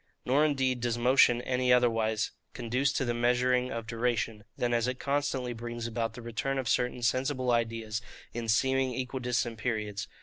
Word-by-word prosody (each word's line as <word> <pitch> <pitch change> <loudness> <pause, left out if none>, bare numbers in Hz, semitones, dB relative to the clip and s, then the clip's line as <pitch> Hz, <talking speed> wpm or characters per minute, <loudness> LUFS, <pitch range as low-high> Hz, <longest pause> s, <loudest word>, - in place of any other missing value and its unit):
Nor 135 +4 +3
indeed 135 -4 +1
does 120 -1 0
motion 120 0 +4
any 125 0 +1
otherwise 115 -3 +2 0.2
conduce 125 +3 0
to 130 - 0
the 120 - 0
measuring 125 +1 +2
of 115 -1 -4
duration, 115 -2 -1
than 120 0 0
as 120 0 +2
it 125 0 -2
constantly 140 -3 -1
brings 120 0 -5
about 115 -1 -2
the 120 - -9
return 120 +4 -2
of 130 -2 -2
certain 125 0 0
sensible 130 +2 +1
ideas, 115 -2 -1 0.3
in 115 -1 -4
seeming 130 +2 +2
equidistant 125 -3 -2
periods. 105 -3 -2
120 Hz, 165 wpm, -30 LUFS, 115-130 Hz, 0.3 s, motion